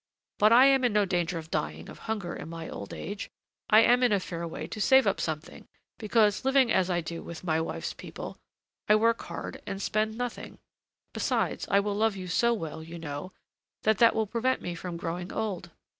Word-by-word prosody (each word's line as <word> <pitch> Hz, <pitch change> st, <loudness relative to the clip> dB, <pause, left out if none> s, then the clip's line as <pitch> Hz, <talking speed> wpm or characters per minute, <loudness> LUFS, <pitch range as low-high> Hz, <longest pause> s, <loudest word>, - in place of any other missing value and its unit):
But 215 Hz, +1 st, +6 dB
I 250 Hz, +3 st, +8 dB
am 270 Hz, -1 st, +5 dB
in 245 Hz, -3 st, +2 dB
no 210 Hz, -1 st, +3 dB
danger 175 Hz, -2 st, -1 dB
of 160 Hz, 0 st, -8 dB
dying 75 Hz, +2 st, -3 dB
of -, -, -11 dB
hunger 200 Hz, -6 st, -2 dB
in -, -, -7 dB
my 165 Hz, -1 st, -6 dB
old 100 Hz, -, -7 dB
age. 205 Hz, 0 st, -6 dB, 0.4 s
I 215 Hz, +1 st, +8 dB
am 245 Hz, +2 st, +5 dB
in 250 Hz, -2 st, +4 dB
a 200 Hz, -, +3 dB
fair 170 Hz, -2 st, -5 dB
way 160 Hz, -1 st, -6 dB
to 215 Hz, +6 st, -6 dB
save 265 Hz, +5 st, +6 dB
up 200 Hz, -, +1 dB
something, 160 Hz, +1 st, -5 dB, 0.3 s
because, 215 Hz, -1 st, +2 dB
living 265 Hz, -2 st, +4 dB
as 190 Hz, -2 st, +2 dB
I 175 Hz, -1 st, +1 dB
do 165 Hz, +1 st, -6 dB
with 170 Hz, +1 st, -9 dB
my 160 Hz, -2 st, +1 dB
wife's 160 Hz, -, -4 dB
people, -, -, -8 dB, 0.5 s
I 210 Hz, -, +7 dB
work 230 Hz, +2 st, +3 dB
hard -, -, -7 dB
and 195 Hz, -, -4 dB
spend 215 Hz, +2 st, -1 dB
nothing. 245 Hz, -1 st, -5 dB, 0.6 s
Besides, -, -, -1 dB
I 200 Hz, 0 st, +4 dB
will 205 Hz, 0 st, -2 dB
love 215 Hz, 0 st, +1 dB
you 185 Hz, -1 st, -6 dB
so 235 Hz, +6 st, +2 dB
well, 160 Hz, -9 st, -4 dB
you 165 Hz, +2 st, -9 dB
know, 160 Hz, +2 st, -6 dB, 0.5 s
that 220 Hz, -2 st, +2 dB
that 230 Hz, -1 st, +6 dB
will 220 Hz, 0 st, +1 dB
prevent 240 Hz, +5 st, 0 dB
me 175 Hz, -, -4 dB
from 170 Hz, 0 st, -6 dB
growing 175 Hz, +2 st, -4 dB
old. 195 Hz, -6 st, -3 dB
200 Hz, 210 wpm, -28 LUFS, 170-225 Hz, 0.6 s, I